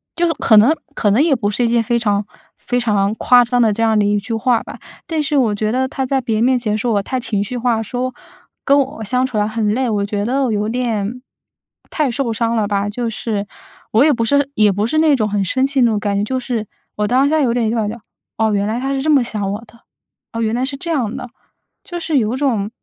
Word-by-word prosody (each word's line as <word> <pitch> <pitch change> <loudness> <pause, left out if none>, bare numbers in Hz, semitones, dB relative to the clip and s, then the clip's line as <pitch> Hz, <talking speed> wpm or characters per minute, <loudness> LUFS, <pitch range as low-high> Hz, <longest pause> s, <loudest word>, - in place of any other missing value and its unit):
就 345 -1 +1
可 220 -6 +4
能 260 +10 +6 0.2
可 210 - +1
能 225 +8 +3
也 305 -5 +3
不 205 -4 -1
是 240 +3 0
一 - - +2
件 230 0 +2
非 235 +1 0
常， 205 -2 0 0.3
非 245 0 -2
常 210 -3 +1
夸 245 +1 +5
张 245 +1 +1
的 220 -2 +4
这 230 - -1
样 220 -1 +3
的 205 - +2
一 205 0 +2
句 225 +3 -6
话 230 +1 +1
吧。 - - -10 0.3
但 320 -2 -1
是 295 0 -1
我 230 -6 +2
觉 215 +1 -1
得 260 +1 0
他 265 0 -3
在 265 0 0
别 230 -3 -2
人 220 - +1
面 255 0 +3
前， 215 -2 -1
说 235 0 -1
我 200 - +2
太 260 +3 -2
情 210 -5 -1
绪 245 +4 -5
化， 235 -2 0
说 250 +3 -3 0.5
跟 280 0 +4
我 260 -5 -2
相 250 +4 0
处 245 -4 -4
得 210 0 +1
很 215 -1 0
累， 255 0 0
我 205 -2 0
觉 205 0 -2
得 270 +3 0
我 245 - 0
有 210 +1 -1
点 235 -1 -2 0.7
太 300 -4 0
受 235 -1 -2
伤 230 +1 -1
了 220 -2 +1
吧。 200 0 -1
就 230 +2 -3
是 210 -2 -3 0.5
我 225 +5 +4
也 305 - +4
不 230 -1 -1
是 285 +3 +2
也 210 -2 +4
不 205 +3 -1
是 310 - -1
那 315 -2 +4
种 215 -4 0
很 200 -1 0
生 260 +8 +1
气 275 -1 +1
的 - - +6
那 230 - +3
种 210 - 0
感 205 -1 -1
觉， 200 - 0
就 260 +4 -2
是 235 -4 -3 0.3
我 210 0 -1
当 260 +4 +3
下 315 - +2
有 240 -4 +2
点 230 -3 0
就 235 - -1
感 215 -2 0
觉： 235 +2 -7 0.4
“哦， 220 -1 +1
原 200 0 0
来 225 +3 -2
他 270 +1 -2
是 270 - -1
这 310 - 0
么 275 -4 +4
想 205 -4 -3
我 205 - -3
的， 230 - -20 0.5
哦， 230 - -3
原 220 0 0
来 250 - -1
是 275 0 -3
这 335 - -6
样 245 -7 -1
的。” 250 - -7 0.5
就 350 -1 -6
是 315 -3 0
有 230 0 +1
种， 235 -8 0
230 Hz, 290 characters per minute, -18 LUFS, 210-260 Hz, 0.7 s, 能